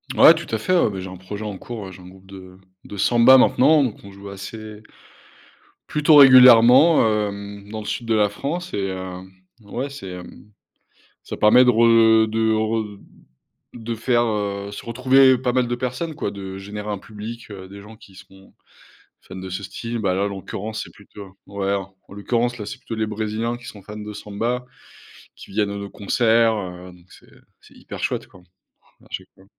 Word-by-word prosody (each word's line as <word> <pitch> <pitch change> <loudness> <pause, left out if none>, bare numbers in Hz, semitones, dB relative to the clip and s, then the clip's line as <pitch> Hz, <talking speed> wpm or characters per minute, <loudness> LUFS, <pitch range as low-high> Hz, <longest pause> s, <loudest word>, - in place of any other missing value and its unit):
Ouais - - +8
tout - - -7
à - - 0
fait, 185 +12 -1
ouais, 170 - +3
bah, 95 - -6
j'ai 95 - -7
un 90 - -10
projet 100 +4 -8
en 105 -3 -5
cours, 105 -5 -8
j'ai 95 0 -13
un 90 - -13
groupe 95 +1 -16
de 95 -1 -13 0.3
de 105 - -9
Samba 120 +6 +6
maintenant, 140 +4 +4
donc 120 -6 -3
on 100 - -11
joue 100 0 -11
assez 105 +2 -9 1.1
plutôt 150 +1 +3
régulièrement, 130 +2 +7 0.2
hem 100 0 -9
dans 110 +1 -6
le 105 - -9
sud 110 +3 -4
de 115 - +1
la 105 -1 +3
France 170 - -5
et 95 -1 -2
heu, 95 -1 -6 0.4
ouais 120 +6 -5
c'est 135 -9 -9
hem, 90 +3 -11 0.7
ça - - -7
permet 120 +4 +5
de - - +4
re 115 -1 +5
de 110 0 +1
re 110 -1 -2 0.8
de 115 -1 -5
faire, 120 +1 +1
heu, 100 -3 -3
se 100 - -9
retrouver 130 +2 +4
pas 125 -1 -1
mal 125 -1 +1
de 120 - -2
personnes 130 +6 -4
quoi. 125 - -3
De 95 -1 -8
générer 105 +2 -7
un 100 - -4
public, 110 +3 -9
heu, 95 -2 -9
des 100 +1 -12
gens 110 +2 -13
qui 100 -3 -18
seront 95 +1 -17 0.7
fans - - -13
de 95 0 -7
ce 95 +2 -5
style. 115 +4 -6
Bah 95 -4 0
là 95 - 0
en - - 0
l'occurrence 100 +2 -6
c'est - - -14
plutôt 100 -1 -14
ouais 100 0 -2
en 95 -1 -4 0.2
l'occurrence 120 +4 -1
là 105 - -6
c'est - - -7
plutôt 115 - -7
les 110 0 -2
brésiliens 110 +2 -3
qui 120 - -15
sont 105 -5 -10
fans 105 +2 -10
de 105 0 -7
samba, 115 +5 -4 0.7
qui - - -14
viennent 105 0 0
à 100 - -5
nos 100 0 -7
concerts, 115 +2 +2
heu, 90 -2 -8
donc 90 -1 -19
c'est - - -19 0.3
c'est - - -20
hyper - - -10
chouette - - -2
quoi, 90 - -18 0.6
à - - -21
chaque - - -6
fois. 95 - -22
105 Hz, 200 wpm, -21 LUFS, 100-120 Hz, 1.1 s, Ouais